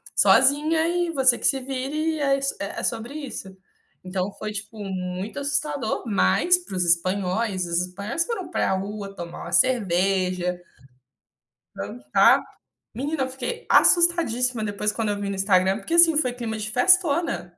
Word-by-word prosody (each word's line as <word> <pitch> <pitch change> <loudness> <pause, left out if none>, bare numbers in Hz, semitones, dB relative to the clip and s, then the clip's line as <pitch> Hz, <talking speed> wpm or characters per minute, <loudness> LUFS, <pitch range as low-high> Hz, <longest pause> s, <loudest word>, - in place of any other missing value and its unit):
sozinha 310 +3 +4
e 350 0 0
você 260 -5 +3
que - - -6
se 270 - +1
vire. 275 +5 -3
É 275 -1 +2
is 275 0 -2
é 200 - -5
sobre 230 +4 -3
isso. 245 -10 -7 0.5
Então 185 +1 -3
foi, 215 - -4
tipo, 215 +2 -8
muito 190 +3 -5
assustador. 285 -4 -2
Mas, 215 - +3
para 350 - -9
os 180 - +1
espanhóis 185 +3 0
os 170 0 0
espanhóis 200 - -3
foram 380 -8 -5
pra - - 0
rua 200 +1 -5
tomar 170 -1 -8
uma - - -8
cerveja, 185 -5 +1 1.1
dançar. 120 +5 +2 0.6
Menina, 285 +3 -2
eu 260 - -3
fiquei 270 - -6
assustadíssima 255 -10 +3
depois, 210 0 -1
quando 225 -2 -2
eu 205 - -2
vi 200 - -4
no 200 - -3
Instagram, 190 0 +2
porque, 330 +11 -3
assim, 335 -2 +6
foi 255 -5 +1
clima 230 -3 -5
de 215 0 -4
festona. 330 - +2
220 Hz, 155 wpm, -24 LUFS, 190-285 Hz, 1.1 s, assim